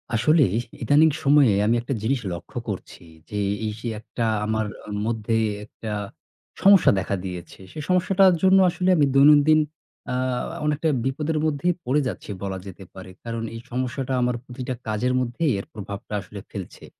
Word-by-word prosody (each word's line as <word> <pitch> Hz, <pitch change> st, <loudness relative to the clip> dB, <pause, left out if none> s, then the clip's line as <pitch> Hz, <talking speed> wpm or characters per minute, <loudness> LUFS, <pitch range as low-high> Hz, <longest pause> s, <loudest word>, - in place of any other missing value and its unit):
আসলে 155 Hz, +6 st, +4 dB, 0.4 s
ইদানীং 145 Hz, +7 st, +5 dB
সময়ে 140 Hz, -6 st, +5 dB
আমি 115 Hz, -, +3 dB
একটা 130 Hz, +3 st, -3 dB
জিনিস 130 Hz, +3 st, +1 dB
লক্ষ্য 85 Hz, -, -9 dB
করছি -, -, -7 dB, 0.3 s
যে, 105 Hz, -, -4 dB, 0.3 s
এই 110 Hz, -, -1 dB
সেই 115 Hz, 0 st, -3 dB
একটা 115 Hz, +2 st, -5 dB, 0.2 s
আমার 110 Hz, 0 st, 0 dB, 0.2 s
অ -, -, -8 dB, 0.2 s
মধ্যেই 115 Hz, 0 st, 0 dB, 0.2 s
একটা 110 Hz, 0 st, -8 dB, 0.7 s
সমস্যা 195 Hz, -2 st, +7 dB
দেখা 95 Hz, +2 st, -2 dB
দিয়েছে। 90 Hz, -1 st, -7 dB
সে 155 Hz, -, -8 dB
সমস্যাটার 185 Hz, +1 st, +4 dB
জন্য 190 Hz, 0 st, +6 dB
আসলে 180 Hz, +1 st, -1 dB
আমি 145 Hz, -, +5 dB
দৈনন্দিন 150 Hz, +2 st, +6 dB, 0.5 s
আ -, -, -1 dB, 0.5 s
অনেকটা 150 Hz, +2 st, +1 dB, 0.2 s
বিপদের 150 Hz, +4 st, -1 dB
মধ্যেই 155 Hz, +3 st, +1 dB
পড়ে 140 Hz, +4 st, +2 dB
যাচ্ছি -, -, -6 dB
বলা 95 Hz, -1 st, -3 dB
যেতে 95 Hz, 0 st, -10 dB
পারে। 95 Hz, 0 st, -10 dB
কারণ 115 Hz, -1 st, -4 dB
এই 115 Hz, -, -7 dB
সমস্যাটা 130 Hz, +1 st, -2 dB
আমার 125 Hz, 0 st, +1 dB
প্রতিটা 130 Hz, 0 st, -5 dB
কাজের 110 Hz, +4 st, 0 dB
মধ্যেই 130 Hz, +5 st, 0 dB
এর -, -, -7 dB
প্রভাবটা 100 Hz, 0 st, -7 dB
আসলে 105 Hz, +1 st, -10 dB
ফেলছে। 95 Hz, -3 st, -8 dB
125 Hz, 160 wpm, -24 LUFS, 110-150 Hz, 0.7 s, সমস্যা